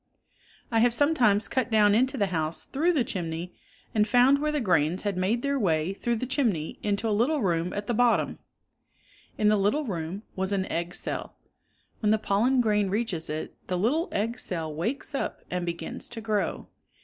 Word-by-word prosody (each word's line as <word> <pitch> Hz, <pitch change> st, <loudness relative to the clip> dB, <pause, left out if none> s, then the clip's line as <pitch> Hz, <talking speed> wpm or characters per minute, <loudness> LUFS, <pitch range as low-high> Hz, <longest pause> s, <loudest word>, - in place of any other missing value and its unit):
1 225 Hz, -1 st, +2 dB
have 240 Hz, 0 st, +4 dB
sometimes 245 Hz, -9 st, +3 dB
cut 260 Hz, -2 st, -1 dB
down 210 Hz, -2 st, +5 dB
into 260 Hz, +5 st, +2 dB
the 205 Hz, -, +2 dB
house 160 Hz, 0 st, -1 dB
through 320 Hz, +6 st, +1 dB
the 295 Hz, -8 st, +2 dB
chimney 175 Hz, -3 st, -4 dB, 0.4 s
and 210 Hz, -1 st, +3 dB
found 250 Hz, +5 st, +5 dB
where 305 Hz, 0 st, +1 dB
the 300 Hz, -, 0 dB
grains 175 Hz, -, +1 dB
had 205 Hz, -2 st, -1 dB
made 195 Hz, +6 st, 0 dB
their 280 Hz, 0 st, 0 dB
way 165 Hz, -3 st, +1 dB
through 235 Hz, +4 st, -1 dB
the 230 Hz, -, -3 dB
chimney 230 Hz, -, -1 dB
into 205 Hz, +2 st, 0 dB
a 215 Hz, -, +1 dB
little 255 Hz, +6 st, +1 dB
room 170 Hz, -1 st, 0 dB
at 205 Hz, 0 st, -3 dB
the, 240 Hz, -, -1 dB
bottom. 240 Hz, +1 st, +2 dB, 1.0 s
In 210 Hz, -, +2 dB
the 215 Hz, -, +4 dB
little 210 Hz, +10 st, +1 dB
room 180 Hz, -1 st, -4 dB
was 190 Hz, +1 st, -1 dB
an 195 Hz, -2 st, 0 dB
egg 170 Hz, +1 st, -2 dB
cell. -, -, -3 dB, 0.6 s
When 210 Hz, -, +1 dB
the 220 Hz, -, +4 dB
pollen 230 Hz, +5 st, +2 dB
grain 210 Hz, -3 st, +2 dB
reaches 195 Hz, -6 st, -2 dB
it, 155 Hz, +1 st, -4 dB
the 180 Hz, -, -1 dB
little 275 Hz, -, +1 dB
egg 230 Hz, +4 st, -1 dB
cell 160 Hz, -4 st, -4 dB
wakes 230 Hz, -, -3 dB
up 275 Hz, -, -3 dB
and 180 Hz, -1 st, -2 dB
be 170 Hz, -, 0 dB
gins -, -, -6 dB
to 240 Hz, -, -6 dB
grow. 210 Hz, -5 st, -1 dB
210 Hz, 195 wpm, -27 LUFS, 180-245 Hz, 1.0 s, down